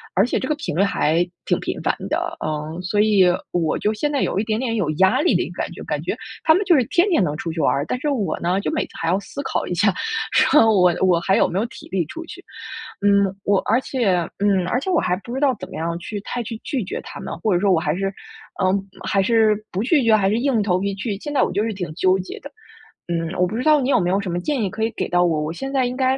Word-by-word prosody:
而 195 - +4
且 245 - -1
这 260 - -3
个 305 - 0
频 295 - -5
率 185 - +2
还 170 -3 +2 0.2
挺 - - +1
频 - - -4
繁 - - +1
的， - - -2
嗯， 155 +3 -4
所 195 +3 -1
以 210 -3 +5 0.3
我 165 -3 0
就 210 +1 +1
现 290 +8 -1
在 280 - 0
有 195 - 0
一 - - +1
点 215 -1 -1
点 240 -3 -1
有 185 -9 0
压 190 +5 +3
力 355 - +3
的 - - +2
一 - - -6
个 - - -5
感 - - -3
觉， - - -9
感 - - -3
觉 - - -2 0.3
他 315 - +6
们 380 - +2
就 345 - +5
是 265 - +4
天 355 - +2
天 330 - +3
能 150 -3 -1
出 165 - -4
去 160 - -5
玩 - - +3
儿。 140 - 0
但 250 - -2
是 295 - -1
我 210 - -1
呢， 180 +3 0
就 - - -2
每 315 - 0
次 - - -19
还 165 - 0
要 185 - +2
思 275 +7 -7
考 - - -2
一 - - -2
下 200 +3 +3 0.4
说： 300 - +5
“我 180 -3 +4
我 180 -3 +4
还 190 +3 +1
有 - - +4
没 180 - -3
有 225 - 0
体 - - -13
力 185 -3 0
出 335 - -7
去。” - - -11 0.6
嗯， 200 -1 +3
我， 200 -1 +3
而 230 +4 +2
且 245 -8 -1 0.3
嗯， 195 -3 +2
而 250 - +1
且 375 - -3
我 345 - +3
还 180 - 0
不 240 - -7
知 265 - -2
道 275 -3 +3
怎 - - -7
么 - - -9
样 170 +1 -2
去 205 +4 -5
太 245 +3 -4
去 225 0 -6
拒 260 -5 -2
绝 185 - -5
他 - - -9
们， - - -6
或 215 - 0
者 175 - +2
说 195 0 +2
我 165 - +4
还 155 0 -1
是， 195 +1 -2 0.5
呃， 185 -1 +3 0.4
还 195 -1 +2
是 220 0 +4 0.2
不 190 - -2
拒 285 +2 +3
绝， 225 -2 +5
还 195 -2 +2
是 215 - +1
硬 270 0 +1
着 - - +2
头 180 -3 +1
皮 200 +1 -1
去？ 200 0 -3
现 295 - -6
在 275 - +3
我 - - 0
就 205 +3 0
是 225 -1 -2
挺 180 -4 -5
纠 185 +1 +2
结 185 - -7
的， 285 - -10 0.6
嗯， 165 0 -2
我 180 - +3
不 205 - -5
知 250 - -1
道 305 -1 +5
你 270 +1 0
有 - - +4
没 175 -1 0
有 195 +2 +2
什 195 - -4
么 175 - -1
建 275 +5 -1
议 195 - -1
可 220 - -5
以 225 - 0
给 - - -2
到 175 0 +3
我， 160 -3 +1
我 155 - -3
现 270 +11 -5
在 265 -2 +2
应 250 +1 -4
该 260 0 +2
200 Hz, 320 characters per minute, -21 LUFS, 180-250 Hz, 0.6 s, 他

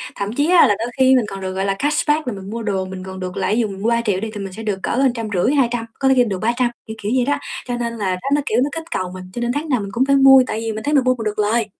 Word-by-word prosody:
Thậm 200 +2 -3
chí 290 +6 +1
á 360 -2 +7
là 205 - +2
đôi 230 - -2
khi 260 0 +6
mình 245 - +2
còn 195 -1 -7
được, 185 0 -4
gọi 190 +1 -2
là, 195 - +1
cashback 295 0 +1
là 245 - -1
mình 195 0 -8
mua 230 +1 -5
đồ 190 -3 -1
mình 185 0 -7
còn 190 0 -8
được 185 -1 -5
lãi. 215 - 0
Ví 240 - +2
dụ 220 - 0
mình 195 -1 -8
mua 225 - +1
3.000.000 230 -5 +1
đi 220 +2 -4
thì 210 - -6
mình 195 -1 -6
sẽ 225 +2 -8
được 200 -3 -2
cỡ - - -1
hơn 265 0 +3
trăm 230 -2 -4
rưỡi, 185 +10 +2
200, 240 -4 +1
có 270 - +1
thể 265 - +5
khi 250 - +5
được 195 -5 -3
300, 240 +2 +1 0.2
kiểu, 220 - -6
kiểu 205 - -2
vậy 250 - +2
đó. 285 +2 +1 0.3
Cho 245 - -2
nên 235 -1 -3
là 195 -4 -1
đó 265 +9 -5
nó 295 - +1
kiểu, 225 - +1
nó 285 - -1
kích 325 +2 -7
cầu 185 -1 -2
mình, 185 0 -8
cho - - -5
nên 240 0 0
tháng 305 +2 -3
nào 255 -5 +2
mình 200 - -5
cũng 250 +5 +1
phải 275 0 +3
mua, 270 -1 +7
tại 220 - -3
vì 225 0 -3
mình 220 - -6
thấy 295 - -1
mình 275 -3 +4
mua 255 0 +2
mình 225 - -6
được 210 0 -2
lời. 215 +2 +2
230 Hz, 360 wpm, -20 LUFS, 200-260 Hz, 0.3 s, á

